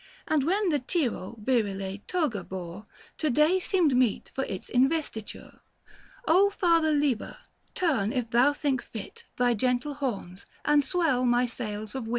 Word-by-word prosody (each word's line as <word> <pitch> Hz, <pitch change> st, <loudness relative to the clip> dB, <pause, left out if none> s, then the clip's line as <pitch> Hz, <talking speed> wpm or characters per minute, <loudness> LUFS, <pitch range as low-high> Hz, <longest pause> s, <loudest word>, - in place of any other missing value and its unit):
840 -, -, +1 dB
And 295 Hz, -3 st, +3 dB
when 390 Hz, +2 st, +2 dB
the 295 Hz, -3 st, +1 dB
Tiro 250 Hz, -, -1 dB
virile 200 Hz, -5 st, -1 dB
toga 295 Hz, -, -1 dB
bore 185 Hz, +2 st, -7 dB, 0.3 s
To 310 Hz, -, +1 dB
day 305 Hz, +8 st, +3 dB
seemed 350 Hz, -7 st, +2 dB
meet 250 Hz, -4 st, +1 dB
for 270 Hz, -, -2 dB
its 185 Hz, -, -6 dB
investiture. 260 Hz, -4 st, -1 dB, 0.7 s
O 380 Hz, +5 st, +5 dB
Father 335 Hz, -5 st, +2 dB
Liber, 285 Hz, -6 st, 0 dB, 0.4 s
turn 260 Hz, -, +1 dB
if 245 Hz, -2 st, -2 dB
thou 250 Hz, +4 st, +5 dB
think 285 Hz, -3 st, -1 dB
fit 220 Hz, -3 st, -9 dB
Thy 245 Hz, -1 st, +3 dB
gentle 250 Hz, +5 st, 0 dB
horns, 210 Hz, -10 st, -5 dB, 0.2 s
and 295 Hz, -1 st, +4 dB
swell 290 Hz, -4 st, +1 dB
my 245 Hz, 0 st, +3 dB
sails 215 Hz, -3 st, -5 dB
of 260 Hz, -4 st, -5 dB
wit. -, -, -6 dB
255 Hz, 160 wpm, -27 LUFS, 220-305 Hz, 0.7 s, O